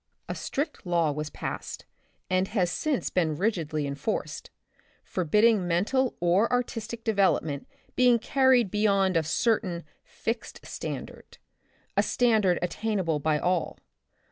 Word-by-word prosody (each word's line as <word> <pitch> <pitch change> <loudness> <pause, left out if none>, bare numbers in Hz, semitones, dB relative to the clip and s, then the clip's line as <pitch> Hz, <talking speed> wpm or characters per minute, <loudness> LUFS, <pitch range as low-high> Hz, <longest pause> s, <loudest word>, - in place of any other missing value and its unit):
A - - -3
strict 290 +4 -3
law 170 -4 +1
was 150 +1 -4
passed, - - -6 0.4
and 185 +1 +1
has 185 -5 0
since 295 +3 -1
been 160 -4 +1
rigidly 165 -7 -1
enforced, 140 0 -3 0.5
forbidding 205 +3 +2
mental 220 +10 +1
or 175 +6 +3
artistic 235 -2 -2
development 190 -9 +1 0.3
being 250 -1 +5
carried 255 -3 +3
beyond 200 -3 +2
a 165 - +4
certain 175 +1 0 0.2
fixed 225 - -5
standard, - - -7 0.6
a - - +5
standard 215 -7 +2
attainable 185 -4 -1
by 150 +1 +1
all. 180 +1 -1
190 Hz, 115 wpm, -27 LUFS, 170-230 Hz, 0.6 s, being